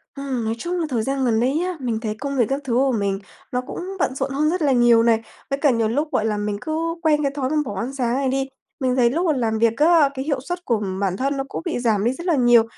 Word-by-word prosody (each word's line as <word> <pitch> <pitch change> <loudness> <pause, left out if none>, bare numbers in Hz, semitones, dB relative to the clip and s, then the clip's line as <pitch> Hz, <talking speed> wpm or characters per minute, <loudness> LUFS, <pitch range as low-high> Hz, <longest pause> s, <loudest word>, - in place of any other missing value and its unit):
Ừm, 265 -5 -3
nói 220 - 0
chung 350 +6 -3
là 325 - 0
thời 230 -4 0
gian 270 +1 -1
gần 225 -2 +2
đây 255 +3 +2
nhé, 355 +2 -1
mình 235 -4 -2
thấy 215 -2 -3
công 280 -1 -3
việc 240 - +4
các 275 +1 -1
thứ 255 -3 -2
của 265 +2 +3
mình 200 -4 -1 0.3
nó 250 - 0
cũng 255 - -7 0.2
bận 260 - 0
rộn 275 - -2
hơn 300 +3 +1
rất 360 +2 -1
là 285 -3 +3
nhiều 240 -2 +5
này, 225 -1 +3 0.3
với 275 0 -1
cả 295 - +4
nhiều 230 -2 +1
lúc, 295 +7 -1
gọi 220 - +1
là, 215 -2 0
mình 205 0 -2
cứ 325 +1 -2
quen 300 -2 +2
cái 275 - +1
thói 260 -2 -1
mà 310 - -1
bỏ 205 - -5
ăn 255 +5 -3
sáng 245 -2 0
này 270 -1 0
đi. 270 0 -1 0.3
Mình 255 -1 +1
thấy 240 -2 +4
lúc 335 +8 0
mà 320 - +3
làm 225 -5 0
việc 230 0 +2
á, 310 -1 +5
cái 265 0 -4
hiệu 285 -3 0
suất 355 +5 -5
của 225 -4 +1 0.2
bản 190 -1 0
thân 275 +1 -1
nó 270 - -1
cũng - - -4
bị 325 - -1
giảm 220 -4 +1
đi 240 - +2
rất 340 +6 -8
là 335 - +3
nhiều. 240 -3 +5
260 Hz, 300 wpm, -22 LUFS, 230-290 Hz, 0.3 s, nhiều